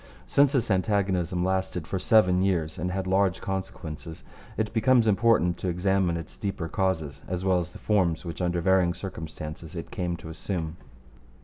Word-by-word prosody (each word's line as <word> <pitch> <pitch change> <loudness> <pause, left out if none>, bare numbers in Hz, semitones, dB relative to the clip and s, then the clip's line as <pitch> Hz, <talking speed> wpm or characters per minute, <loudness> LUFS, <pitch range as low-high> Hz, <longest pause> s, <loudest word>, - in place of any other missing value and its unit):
Since 140 - +4
this 120 -6 +1
antagonism 95 -3 +1
lasted 95 -3 -1
for 95 +3 -3
seven 90 -3 +4
years 85 -5 0
and 90 +3 -1
had 95 0 -2
large 95 -2 +2
consequences, 80 -4 -5 0.3
it 110 0 -1
becomes 115 +1 +4
important 105 -4 +3
to - - -3
examine 90 0 +1
its 80 -3 -9
deeper 95 -5 -3
causes 80 -6 -1
as 90 +1 -3
well 95 -1 +3
as 90 0 -4
the - - -10
forms 90 -6 +1
which 85 +1 -5
under 85 -1 0
varying 90 -1 +3
circumstances 80 -2 -7
it 85 - -6
came 90 -5 -2
to 80 - -10
assume. 80 -1 -4
90 Hz, 170 wpm, -27 LUFS, 85-95 Hz, 0.3 s, Since